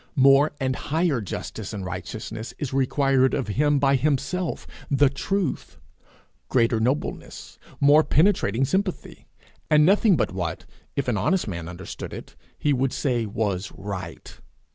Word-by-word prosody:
More 140 Hz, +2 st, +5 dB
and 130 Hz, -1 st, 0 dB
higher 155 Hz, -4 st, 0 dB
justice 105 Hz, +1 st, -6 dB
and 100 Hz, -3 st, -5 dB
righteousness 110 Hz, +5 st, -6 dB
is 135 Hz, -3 st, -4 dB
required 135 Hz, 0 st, +2 dB
of 130 Hz, -6 st, -3 dB
him 145 Hz, +6 st, +2 dB
by 140 Hz, 0 st, +3 dB
himself, 155 Hz, +6 st, -1 dB, 0.2 s
the 140 Hz, 0 st, +4 dB
Truth; 185 Hz, +3 st, -2 dB, 0.7 s
greater 115 Hz, -2 st, +2 dB
nobleness, 130 Hz, +6 st, -3 dB, 0.2 s
more 145 Hz, +2 st, +6 dB
penetrating 145 Hz, -, +2 dB
sympathy; 190 Hz, +5 st, -3 dB, 0.4 s
and 150 Hz, 0 st, +5 dB
nothing 200 Hz, 0 st, +4 dB
but 120 Hz, -, -1 dB
what, 85 Hz, -3 st, -4 dB, 0.3 s
if 140 Hz, -, -1 dB
an 120 Hz, -4 st, +1 dB
honest 185 Hz, -, +1 dB
man 85 Hz, -4 st, -5 dB
understood 90 Hz, +2 st, -8 dB
it, -, -, -9 dB, 0.2 s
he 145 Hz, -, +1 dB
would 130 Hz, 0 st, 0 dB
say 120 Hz, -5 st, -1 dB
was 100 Hz, -2 st, -2 dB
right. 100 Hz, -1 st, -7 dB
135 Hz, 140 wpm, -24 LUFS, 110-150 Hz, 0.7 s, more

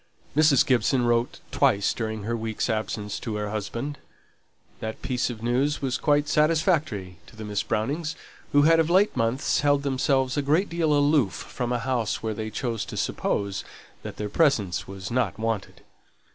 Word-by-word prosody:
Mrs. 150 Hz, -3 st, +5 dB
Gibson 125 Hz, 0 st, +2 dB
wrote 120 Hz, 0 st, 0 dB
twice 100 Hz, 0 st, +2 dB
during 110 Hz, -2 st, -4 dB
her 115 Hz, +3 st, -1 dB
week's 115 Hz, +1 st, -2 dB
absence 110 Hz, -1 st, -3 dB
to 110 Hz, -, -4 dB
her 105 Hz, -1 st, -3 dB
husband. 115 Hz, +7 st, -4 dB, 0.8 s
That 110 Hz, 0 st, -6 dB
piece 125 Hz, -1 st, 0 dB
of 115 Hz, -2 st, -7 dB
news 130 Hz, +5 st, +1 dB
was 130 Hz, -2 st, -1 dB
quite 145 Hz, -1 st, +2 dB
satisfactory 150 Hz, -, +1 dB
to -, -, -16 dB
the 110 Hz, 0 st, -7 dB
Miss 105 Hz, -1 st, -1 dB
Brownings, 150 Hz, +9 st, -2 dB, 0.4 s
who 145 Hz, 0 st, +5 dB
had 165 Hz, +2 st, +5 dB
of 165 Hz, 0 st, +2 dB
late 190 Hz, +4 st, +4 dB, 0.5 s
held 145 Hz, -1 st, +2 dB
themselves 135 Hz, -1 st, +1 dB
a -, -, +3 dB
great 155 Hz, +8 st, +2 dB
deal 165 Hz, -2 st, 0 dB
aloof 145 Hz, -, +3 dB
from 125 Hz, +5 st, -4 dB
a 125 Hz, -, +1 dB
house 120 Hz, -3 st, -1 dB
where 110 Hz, -1 st, -1 dB
they 110 Hz, +1 st, -4 dB
chose 115 Hz, 0 st, -2 dB
to -, -, -7 dB
suppose 100 Hz, -1 st, -1 dB, 0.4 s
that -, -, -8 dB
their 105 Hz, -, -3 dB
presence 105 Hz, -, +1 dB
was 95 Hz, 0 st, -7 dB
not 125 Hz, +1 st, 0 dB
wanted. 110 Hz, -2 st, -3 dB
125 Hz, 170 wpm, -25 LUFS, 110-145 Hz, 0.8 s, Mrs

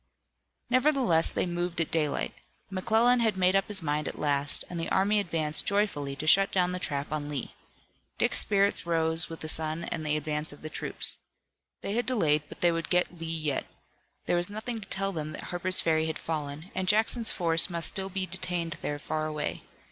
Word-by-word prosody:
Nevertheless 255 Hz, -, +3 dB
they -, -, -1 dB
moved 175 Hz, 0 st, -3 dB
at 165 Hz, -, 0 dB
daylight. 155 Hz, -3 st, -1 dB, 0.4 s
McClellan 225 Hz, +6 st, +3 dB
had 220 Hz, -4 st, +1 dB
made 185 Hz, +1 st, +3 dB
up 195 Hz, -, +2 dB
his 200 Hz, -4 st, +3 dB
mind 150 Hz, 0 st, -1 dB
at -, -, -6 dB
last, 145 Hz, -1 st, +1 dB
and 175 Hz, -, -6 dB
the 165 Hz, -, -3 dB
army 205 Hz, +2 st, +2 dB
advanced 160 Hz, -5 st, -1 dB
joyfully 190 Hz, -9 st, 0 dB
to 150 Hz, -, -6 dB
shut 195 Hz, +5 st, +5 dB
down 180 Hz, -1 st, +1 dB
the 180 Hz, -, -3 dB
trap 145 Hz, -4 st, -3 dB
on 150 Hz, -1 st, -3 dB
Lee. 145 Hz, -3 st, -5 dB, 0.6 s
Dick's -, -, +3 dB
spirits 200 Hz, -3 st, +2 dB
rose 160 Hz, -1 st, +1 dB
with 165 Hz, -, -9 dB
the 155 Hz, -, -4 dB
sun 160 Hz, +1 st, +2 dB
and 165 Hz, -1 st, -4 dB
the 150 Hz, 0 st, 0 dB
advance 150 Hz, 0 st, 0 dB
of 145 Hz, -, -13 dB
the 155 Hz, -, -7 dB
troops. -, -, +2 dB, 0.6 s
They 200 Hz, -, -3 dB
had 240 Hz, +2 st, -1 dB
delayed, 160 Hz, -12 st, +2 dB
but -, -, -12 dB
they 175 Hz, -, +4 dB
would 165 Hz, 0 st, -3 dB
get 180 Hz, -1 st, 0 dB
Lee 165 Hz, -, -5 dB
yet. 155 Hz, -4 st, -2 dB, 0.6 s
There 175 Hz, -, +1 dB
was 175 Hz, +2 st, +3 dB
nothing 220 Hz, +3 st, -4 dB
to 200 Hz, -, -11 dB
tell 195 Hz, 0 st, 0 dB
them 155 Hz, -3 st, -5 dB
that -, -, -8 dB
Harper's 180 Hz, +1 st, +3 dB
Ferry 160 Hz, -1 st, +1 dB
had 160 Hz, -, -3 dB
fallen, 155 Hz, +2 st, -5 dB
and 185 Hz, 0 st, -3 dB
Jackson's 220 Hz, +3 st, +2 dB
force 165 Hz, 0 st, +3 dB
must 170 Hz, -1 st, +2 dB
still 190 Hz, -1 st, -3 dB
be 190 Hz, 0 st, -2 dB
detained 175 Hz, -3 st, -3 dB
there 145 Hz, -, -3 dB
far 155 Hz, +1 st, -3 dB
away. 150 Hz, -1 st, -4 dB
170 Hz, 200 wpm, -28 LUFS, 155-195 Hz, 0.6 s, shut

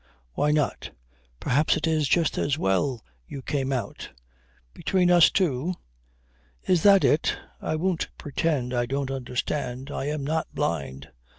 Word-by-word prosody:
Why 150 Hz, -, +1 dB
not. 150 Hz, -1 st, 0 dB, 0.5 s
Perhaps 150 Hz, +5 st, +2 dB
it -, -, -2 dB
is 155 Hz, -3 st, +1 dB
just 165 Hz, 0 st, +2 dB
as 145 Hz, 0 st, 0 dB
well 115 Hz, +2 st, 0 dB, 0.2 s
you 135 Hz, -, -8 dB
came 135 Hz, -1 st, -1 dB
out. 120 Hz, -6 st, -4 dB, 0.6 s
Between 180 Hz, -2 st, +1 dB
us 175 Hz, -2 st, +7 dB
two? 175 Hz, -1 st, 0 dB, 0.9 s
Is 180 Hz, -3 st, +3 dB
that 200 Hz, 0 st, +6 dB
it? 150 Hz, -, +2 dB, 0.2 s
I 155 Hz, -, -1 dB
won't 175 Hz, +1 st, -1 dB
pretend 145 Hz, -4 st, -1 dB
I 120 Hz, -1 st, 0 dB
don't 135 Hz, +1 st, -2 dB
understand. 130 Hz, +1 st, -3 dB
I 135 Hz, -, -3 dB
am 150 Hz, 0 st, -2 dB
not 160 Hz, +3 st, -1 dB
blind. 70 Hz, -4 st, -3 dB
145 Hz, 140 wpm, -26 LUFS, 125-160 Hz, 0.9 s, us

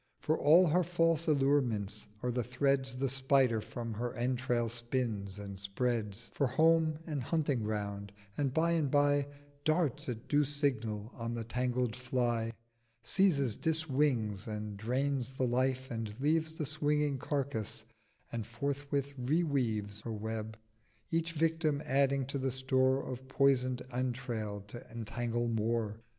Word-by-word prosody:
For 155 Hz, -, +1 dB
all 160 Hz, +5 st, +6 dB
her 175 Hz, +2 st, +3 dB
false 165 Hz, -2 st, +1 dB
allurements 130 Hz, -8 st, +1 dB, 0.2 s
are 125 Hz, -, +1 dB
the 125 Hz, 0 st, 0 dB
Threads 130 Hz, +1 st, 0 dB
The 135 Hz, +1 st, +1 dB
Spider 130 Hz, -3 st, +3 dB
from 115 Hz, 0 st, -5 dB
her 120 Hz, +3 st, -3 dB
Entrail 120 Hz, -1 st, 0 dB
spins, 115 Hz, -4 st, -2 dB
and 100 Hz, -1 st, -7 dB
spreads 110 Hz, +1 st, -2 dB
For 140 Hz, -, +2 dB
Home 160 Hz, +3 st, +3 dB
and 150 Hz, -4 st, -2 dB
hunting 145 Hz, -2 st, 0 dB
ground: 100 Hz, -2 st, -3 dB, 0.2 s
And 140 Hz, -3 st, 0 dB
by 165 Hz, +4 st, +2 dB
and 160 Hz, -4 st, +2 dB
by 145 Hz, 0 st, +3 dB, 0.4 s
Darts 155 Hz, -2 st, +1 dB
at 115 Hz, -1 st, -5 dB
due 145 Hz, 0 st, +4 dB
Signal 120 Hz, -7 st, -1 dB
on 115 Hz, 0 st, -4 dB
the 115 Hz, -, -3 dB
tangled 125 Hz, 0 st, -1 dB
Fly, 120 Hz, -3 st, 0 dB, 0.5 s
Seizes, 140 Hz, -, +3 dB
dis 160 Hz, 0 st, 0 dB
wings, 120 Hz, -8 st, +1 dB
and 105 Hz, -1 st, -4 dB
drains 130 Hz, +4 st, -1 dB
the 130 Hz, 0 st, 0 dB
Life, 130 Hz, +1 st, 0 dB
and 115 Hz, -1 st, -2 dB
leaves 160 Hz, +3 st, +1 dB
900 -, -, -17 dB
The 155 Hz, -, -1 dB
swinging 150 Hz, -1 st, +1 dB
Carcase, 135 Hz, -5 st, -2 dB, 0.5 s
and 115 Hz, -3 st, -3 dB
forthwith 140 Hz, +3 st, -2 dB
re 150 Hz, +8 st, +2 dB
weaves 110 Hz, -8 st, -1 dB
Her 115 Hz, -, -4 dB
Web: 110 Hz, 0 st, -4 dB, 0.5 s
each 165 Hz, 0 st, 0 dB
Victim 160 Hz, -2 st, +1 dB
adding 135 Hz, 0 st, +2 dB
to 140 Hz, +1 st, -3 dB
the 135 Hz, 0 st, 0 dB
store 130 Hz, +1 st, +2 dB
Of 130 Hz, +1 st, -6 dB
poison'd 130 Hz, -2 st, +2 dB
Entrail 120 Hz, -5 st, -2 dB
to 120 Hz, +3 st, -8 dB
entangle 120 Hz, +1 st, -2 dB
more. 115 Hz, -1 st, 0 dB
130 Hz, 145 wpm, -33 LUFS, 115-145 Hz, 0.5 s, all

